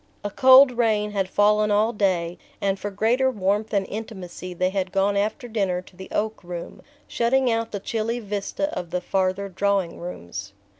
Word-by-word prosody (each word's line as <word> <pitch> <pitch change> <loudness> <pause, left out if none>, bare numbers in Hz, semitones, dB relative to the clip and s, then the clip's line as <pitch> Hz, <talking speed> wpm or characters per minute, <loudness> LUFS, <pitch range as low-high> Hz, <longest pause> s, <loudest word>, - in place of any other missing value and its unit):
A 205 - -3
cold 260 +2 +7
rain 210 -3 +2
had 195 -2 -1
fallen 210 +1 +3
all 215 +3 +2
day, 180 -5 0 0.2
and 195 -1 0
for 205 - -3
greater 230 +6 +2
warmth 205 -1 0
and 200 -2 +1
intimacy 190 -4 -7
they 185 +1 0
had 190 -2 -2
gone 195 +1 +2
after 215 +6 -1
dinner 195 -6 0
to 185 - -19
the 190 +1 -10
oak 215 0 -2
room, 175 -1 -7 0.3
shutting 250 +1 +2
out 230 0 -1
the 205 - -3
chilly 225 +3 -2
vista 210 +7 -3
of 175 - -4
the 180 - -1
farther 190 +1 -1
drawing 195 -1 0
rooms. 100 - -7
200 Hz, 180 wpm, -24 LUFS, 185-220 Hz, 0.3 s, cold